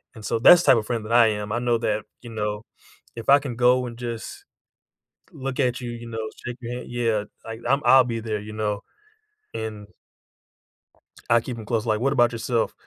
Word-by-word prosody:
and 110 Hz, -2 st, -10 dB
so 115 Hz, -, 0 dB
that's 175 Hz, +9 st, +8 dB
the -, -, -6 dB
type -, -, +3 dB
of 105 Hz, -, -7 dB
friend 115 Hz, -3 st, -2 dB
that 115 Hz, -, -3 dB
I 120 Hz, -1 st, +7 dB
am. 105 Hz, -1 st, -2 dB
I 120 Hz, -, 0 dB
know 120 Hz, -1 st, +1 dB
that, 105 Hz, -2 st, -1 dB, 0.2 s
you 120 Hz, -, -10 dB
know, 105 Hz, -1 st, -3 dB, 0.5 s
if 115 Hz, +1 st, -6 dB
I 140 Hz, -, +9 dB
can 135 Hz, -4 st, -6 dB
go 125 Hz, +1 st, +3 dB
and 120 Hz, -1 st, -9 dB
just 120 Hz, -, -6 dB, 0.9 s
look 135 Hz, -4 st, -5 dB
at 125 Hz, -2 st, 0 dB
you, 120 Hz, -1 st, -5 dB
you 120 Hz, 0 st, -8 dB
know, 115 Hz, -1 st, -4 dB, 0.2 s
shake 120 Hz, 0 st, -5 dB
your 120 Hz, 0 st, -5 dB
hand 125 Hz, -1 st, -7 dB
Yeah, 115 Hz, -3 st, 0 dB, 0.2 s
like, 115 Hz, 0 st, -7 dB
I'm 140 Hz, +2 st, +2 dB
I'll 130 Hz, -1 st, +7 dB
be 115 Hz, -2 st, -3 dB
there, 110 Hz, -1 st, -3 dB
you 105 Hz, +1 st, -9 dB
know, 105 Hz, -2 st, -2 dB, 0.7 s
and 110 Hz, -2 st, -5 dB, 1.4 s
I 120 Hz, 0 st, +5 dB
keep 120 Hz, +1 st, -6 dB
'em 110 Hz, -, -8 dB
close, 115 Hz, +1 st, -1 dB
like 110 Hz, -1 st, +1 dB
What 135 Hz, +3 st, +1 dB
about 120 Hz, -4 st, +3 dB
yourself? 115 Hz, 0 st, -1 dB
115 Hz, 215 wpm, -24 LUFS, 110-125 Hz, 1.4 s, I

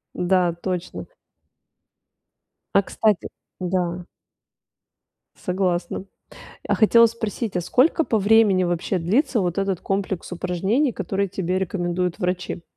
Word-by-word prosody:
Да, 180 Hz, -1 st, +2 dB
точно. 180 Hz, -2 st, -4 dB, 1.7 s
А, 200 Hz, -, +7 dB
кстати, 210 Hz, 0 st, 0 dB, 0.3 s
да. 180 Hz, -1 st, -1 dB, 1.3 s
Согласна. 180 Hz, 0 st, -2 dB, 0.6 s
А -, -, +2 dB
хотела 230 Hz, +1 st, +6 dB
спросить, 220 Hz, -3 st, -4 dB
а -, -, +1 dB
сколько 295 Hz, -, +2 dB
по 220 Hz, -, +1 dB
времени 205 Hz, -2 st, +4 dB
вообще 175 Hz, +2 st, -1 dB
длится 230 Hz, -, +1 dB
вот 175 Hz, 0 st, -1 dB
этот 195 Hz, -2 st, -1 dB
комплекс 195 Hz, -2 st, -3 dB
упражнений, 190 Hz, -, 0 dB
которые 195 Hz, +1 st, -2 dB
тебе 185 Hz, -1 st, -2 dB
рекомендуют 180 Hz, -1 st, -2 dB
врачи? 180 Hz, -1 st, -3 dB
185 Hz, 110 wpm, -23 LUFS, 180-205 Hz, 1.7 s, А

